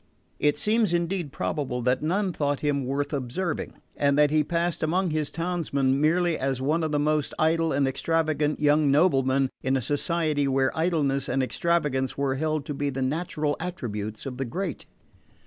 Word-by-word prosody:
It 145 0 +2
seems 215 0 +2
indeed 170 -2 -1
probable 130 -5 -2
that 125 +1 +1
none 185 +4 0
thought 145 -2 -1
him 140 -3 0
worth 140 +3 -2
observing 145 +6 -3 0.2
and 140 0 +2
that 150 -1 +4
he 155 0 +3
passed 170 +2 -1
among 175 +3 +1
his 155 -1 -1
townsmen 145 -6 0
merely 170 +1 +2
as 135 -1 -1
one 155 +5 0
of 155 - -1
the 150 - +1
most 150 0 0
idle 165 +1 +2
and 140 0 +2
extravagant 155 +1 0
young 150 0 +3
noblemen 135 -3 +3
in 130 +1 +1
a - - 0
society 150 +1 0
where 135 0 +1
idleness 150 -5 0
and 135 - +1
extravagance 145 -3 0
were 140 -1 0
held 155 +1 -1
to 145 - -4
be 145 0 -1
the 135 -1 -2
natural 150 +1 -1
attributes 110 - -5
of 130 -2 -5
the 135 - -2
great. 175 +5 -4
150 Hz, 175 wpm, -26 LUFS, 135-165 Hz, 0.2 s, that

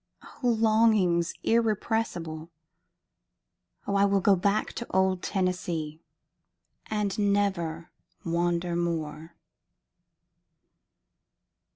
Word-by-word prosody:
O 250 - 0
longings 215 -6 +3
irrepressible! 215 -8 -1 1.4
O 200 - -1
I 200 - +4
will 200 0 +3
go 200 0 +4
back 200 +4 0
to 235 - -6
old 190 -1 +1
Tennessee, 175 -5 -2 0.9
and 210 -2 -1
never 195 -5 0 0.3
wander 170 +1 0
more! 165 -1 -3
185 Hz, 75 wpm, -27 LUFS, 170-210 Hz, 1.4 s, I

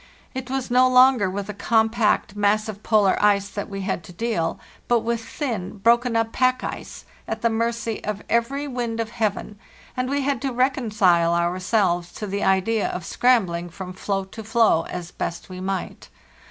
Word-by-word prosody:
It 260 -1 -5
was 265 -1 -3
no 255 +1 +5
longer 255 -5 +5
with 200 +1 -4
the 210 - -6
compact, 220 0 +1
massive 205 0 0
polar 210 -4 +3
ice 200 -1 +3
that 205 0 -5
we 195 -1 -5
had 190 -2 -2
to - - -11
deal, 195 -3 -2 0.3
but 240 -1 +3
with 230 0 -2
thin, 225 - -4
broken 235 +3 +3
up 225 0 +1
pack 255 +1 +1
ice, - - -7 0.2
at - - -4
the 230 - +3
mercy 230 0 -2
of 210 -1 -4
every 270 +5 0
wind 240 -4 -3
of 225 -1 -2
heaven, 210 -2 -2 0.4
and 255 0 -1
we 285 +1 0
had 275 -3 -1
to 270 -1 -1
reconcile 210 -10 +2
ourselves 175 0 +1
to 215 - -5
the 200 0 -3
idea 190 +3 +2
of 180 -2 -5
scrambling 185 -9 +1
from 185 +2 -8
floe 195 +1 -2
to 220 +4 -10
floe 220 -6 +3
as 175 -1 -6
best 170 - -5
we 185 0 -7
might. 190 0 -4
215 Hz, 180 wpm, -23 LUFS, 190-235 Hz, 0.4 s, no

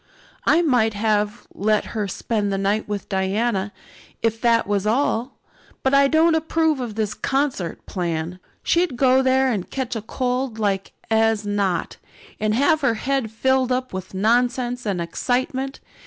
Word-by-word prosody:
"I 340 - +5
might 235 -8 +2
have 210 +1 0
let 215 +2 +1
her 215 -3 -1
spend 205 +1 -2
the 195 - 0
night 200 +2 0
with 205 -1 -4
Diana, 195 +1 0 0.5
if 225 0 0
that 230 -1 +3
was 205 0 0
all. 245 +1 0 0.5
But 265 - +2
I 275 0 +6
don't 320 +3 +4
approve 320 -1 +1
of 235 -4 -4
this 215 -2 -1
concert 270 - -2
plan. 170 0 -3 0.2
She'd 335 -7 +1
go 260 0 +4
there 260 0 +3
and 200 -6 -3
catch 260 -3 -3
cold 250 -2 -2
like 200 -3 -1 0.2
as 220 -1 +2
not, 200 -3 -1 0.4
and 215 0 +1
have 295 +5 +3
her 250 -5 +2
head 265 0 -1
filled 260 +3 +1
up 255 -2 -1
with 185 0 -6
nonsense 245 +3 +1
and 195 -3 -1
excitement. 260 +9 -2
230 Hz, 155 wpm, -22 LUFS, 205-265 Hz, 0.5 s, I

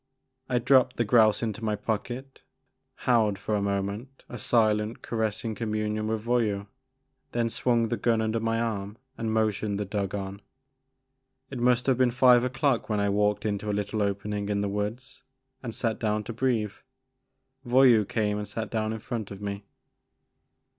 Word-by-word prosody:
I 125 - +2
dropped 130 +1 +4
the 120 - +1
grouse 110 0 +4
into 110 0 -3
my 105 -1 0
pocket, 120 +5 -4 0.6
held 110 -5 +3
for 100 +2 -3
a 105 - +1
moment 100 +6 -3
a 120 - -8
silent 110 -1 +1
caressing 110 0 -2
communion 110 -1 -2
with 110 -1 -2
Voyou, 110 -4 0 0.7
then 115 -1 0
swung 120 -1 +1
my 120 - -1
gun 115 -2 +2
under 110 +1 0
my 115 0 0
arm 105 -2 -3 0.2
and 115 -2 -2
motioned 110 -2 0
the 105 - -1
dog 100 0 -2
on. 100 0 -5 1.1
It 130 - -5
must 125 0 +3
have 130 -2 +2
been 130 -1 +5
five 125 0 +5
o'clock 130 -1 0
when 105 -1 +1
I 100 0 +1
walked 105 +1 +1
into 105 0 -2
a - - 0
little 105 +1 -2
opening 100 0 -2
in 100 -1 0
the 100 - 0
woods 105 +6 -4 0.4
and 120 - -5
sat 110 -1 -2
down 105 -1 0
to 115 - -6
breathe. 115 -4 0 0.9
Voyou 125 -3 +5
came 105 0 -1
and 105 - -5
sat 110 -2 -5
down 110 -1 -1
in 110 - -5
front 110 -2 -5
of 100 - -8
me. 100 -1 -5
110 Hz, 170 wpm, -27 LUFS, 105-120 Hz, 1.1 s, been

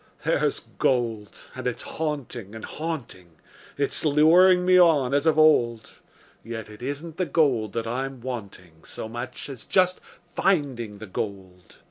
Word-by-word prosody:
There's - - +1 0.2
gold, 115 -5 0 0.2
and - - -5
it's - - -3
haunting 130 -9 -5
and 110 - -7
haunting; 130 - -6 0.4
It's 140 -1 -1
luring 175 +5 +5
me 185 0 +6
on 150 -7 +4
as 145 +3 +2
of 155 -1 +3
old; 120 -8 +3 0.5
Yet 115 -1 -7
it 105 - -13
isn't 145 +5 -5
the 185 - -1
gold 125 -10 +1
that 115 -1 -2
I'm 130 +3 -3
wanting 100 -9 -8
So - - -6
much 120 +3 -6
as 135 -5 -9
just 185 -1 +2 0.3
finding 140 - -1
the 110 - -8
gold. 95 -2 -7
130 Hz, 145 wpm, -25 LUFS, 110-155 Hz, 0.5 s, me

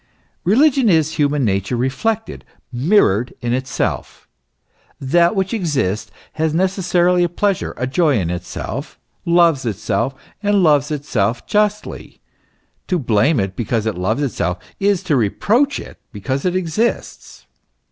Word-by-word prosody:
Religion 255 - +4
is 160 -3 +3
human 145 -3 +1
nature 95 +3 -1
reflected, 210 - -2 0.3
mirrored 125 - +2
in 120 -1 -2
itself. 130 +1 -3 0.7
That 170 +8 +2
which 190 +1 -1
exists 135 - -1 0.2
has 160 0 -1
necessarily 180 -1 +2
a 175 - +1
pleasure, 195 +2 -1
a 125 - -1
joy 145 +1 +2
in 85 -4 -1
itself, 90 0 -6 0.3
loves 170 -5 +3
itself, 115 +4 -2 0.3
and 205 -2 +2
loves 150 -3 +3
itself 120 -7 -1
justly; 210 0 -1 0.7
to 180 - +1
blame 120 +1 +2
it 95 -1 -2
because 115 0 -1
it 110 - 0
loves 105 +10 -1
itself 90 -9 -1 0.2
is 195 -2 +1
to 165 -5 +1
reproach 220 - +1
it - - -11
because 130 - -3
it 180 0 +1
exists. 185 +6 -2
150 Hz, 130 wpm, -19 LUFS, 120-185 Hz, 0.7 s, Religion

